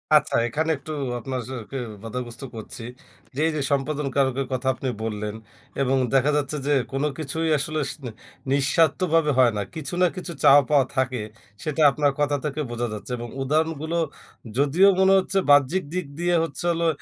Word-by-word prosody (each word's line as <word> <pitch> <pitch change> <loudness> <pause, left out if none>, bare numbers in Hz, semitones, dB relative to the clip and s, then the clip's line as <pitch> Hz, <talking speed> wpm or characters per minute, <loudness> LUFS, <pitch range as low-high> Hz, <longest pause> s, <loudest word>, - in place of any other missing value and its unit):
আচ্ছা, 150 0 +3
এখানে 160 +7 -1
একটু 155 - -9 0.3
আপনার 130 +1 -4
যে - - -5 0.2
কেউ 130 -3 -3 0.2
বাধাগ্রস্থ 120 +2 -6
করছি। 115 +1 -7 0.5
যে 145 - -1
এই 160 - +1
যে, 150 - -1
সম্প্রদান 140 +1 0
কারকের 135 -1 +1
কথা 130 +1 -2
আপনি 130 0 -4
বললেন 105 -1 -3 0.5
এবং 135 0 +2 0.2
দেখা 135 +2 +4
যাচ্ছে 145 +1 -1
যে, 145 - +3 0.2
কোন 135 +2 -1
কিছুই 160 +2 -2
আসলে 155 +2 -1
সি - - -7 0.5
নিঃস্বার্থভাবে 155 +3 +3
হয় 125 -2 +6
না। - - 0
কিছু 155 -1 -4
না - - +6
কিছু 180 -1 -3
চাওয়া 145 0 +8
পাওয়া 140 -3 +4
থাকে, 130 -3 0 0.4
সেটা 155 0 -2
আপনার 145 0 +1
কথা 145 0 +2
থেকে 150 +1 -2
বোঝা 120 0 -2
যাচ্ছে। 105 +4 -7
এবং 120 0 -6 0.2
উদাহরণগুলো 160 +3 0 0.6
যদিও 150 +8 +5
মনে 190 0 +5
হচ্ছে, 195 +1 -2
বাহ্যিক 145 +6 +5
দিক 180 -3 -2
দিয়ে 175 0 +2
হচ্ছে 165 +2 -4
হলো, 170 0 0
145 Hz, 175 wpm, -24 LUFS, 130-160 Hz, 0.6 s, চাওয়া